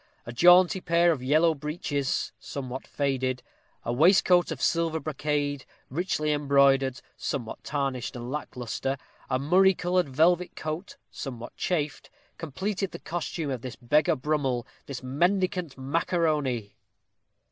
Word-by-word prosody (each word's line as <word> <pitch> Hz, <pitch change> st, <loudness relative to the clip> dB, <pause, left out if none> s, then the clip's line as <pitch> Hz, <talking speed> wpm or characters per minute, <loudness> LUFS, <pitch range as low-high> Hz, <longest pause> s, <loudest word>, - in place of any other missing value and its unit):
A 120 Hz, -, -6 dB
jaunty 180 Hz, -, +6 dB
pair 170 Hz, 0 st, +3 dB
of 150 Hz, -6 st, -2 dB
yellow 155 Hz, +5 st, +3 dB
breeches, 145 Hz, -2 st, -2 dB
somewhat 130 Hz, -2 st, -6 dB
faded; 130 Hz, -3 st, -1 dB, 0.4 s
a 120 Hz, -, -1 dB
waistcoat 175 Hz, +4 st, +5 dB
of 160 Hz, -5 st, -4 dB
silver 165 Hz, +2 st, +1 dB
brocade, 145 Hz, -2 st, -2 dB, 0.3 s
richly 155 Hz, -1 st, 0 dB
embroidered, 140 Hz, -2 st, +3 dB, 0.2 s
somewhat 120 Hz, -6 st, -4 dB
tarnished 135 Hz, -4 st, -2 dB
and 120 Hz, +1 st, -6 dB
lack 150 Hz, 0 st, -5 dB
lustre; 125 Hz, +3 st, -3 dB, 0.3 s
a 130 Hz, -, +2 dB
murrey 185 Hz, +7 st, +4 dB
colored 180 Hz, -3 st, 0 dB
velvet 175 Hz, +6 st, +2 dB
coat, 155 Hz, +5 st, -5 dB
somewhat 120 Hz, -4 st, -7 dB
chafed, 155 Hz, -5 st, -2 dB, 0.3 s
completed 190 Hz, +5 st, -3 dB
the -, -, -8 dB
costume 165 Hz, -3 st, -3 dB
of 130 Hz, -3 st, -3 dB
this 130 Hz, +1 st, -6 dB
beggar 145 Hz, +5 st, +2 dB
Brummell, 135 Hz, -3 st, -1 dB, 0.2 s
this 135 Hz, -2 st, -6 dB
mendicant 180 Hz, +3 st, 0 dB
macaroni! 140 Hz, -, 0 dB
145 Hz, 125 wpm, -27 LUFS, 130-170 Hz, 0.4 s, jaunty